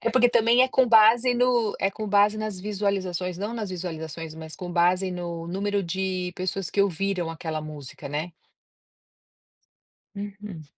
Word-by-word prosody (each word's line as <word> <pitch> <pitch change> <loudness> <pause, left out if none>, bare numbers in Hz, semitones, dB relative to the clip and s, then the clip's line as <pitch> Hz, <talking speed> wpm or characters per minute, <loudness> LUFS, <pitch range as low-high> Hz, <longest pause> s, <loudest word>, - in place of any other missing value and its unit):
É 230 - 0
porque 245 +1 +5
também 235 +1 +4
é 260 - +3
com 260 0 +3
base 230 +3 +6
no 240 -3 +2
é 195 - +3
com 215 +1 -6
base 205 +1 +4
nas 215 -3 -4
visualizações, 190 -3 -2
não 210 +4 -3
nas 215 -4 -4
visualizações, 160 -3 -6
mas 160 -1 -9
com 175 -1 -6
base 180 +2 +2
no 170 -2 -5
número 200 +3 -1
de 185 0 -2
pessoas 185 0 -2
que 200 - +3
ouviram 190 -2 -1
aquela 160 -1 -4
música, 150 -3 -9
né. 155 +5 -3 1.8
Uhum. 205 -4 -7
190 Hz, 155 wpm, -25 LUFS, 170-210 Hz, 1.8 s, base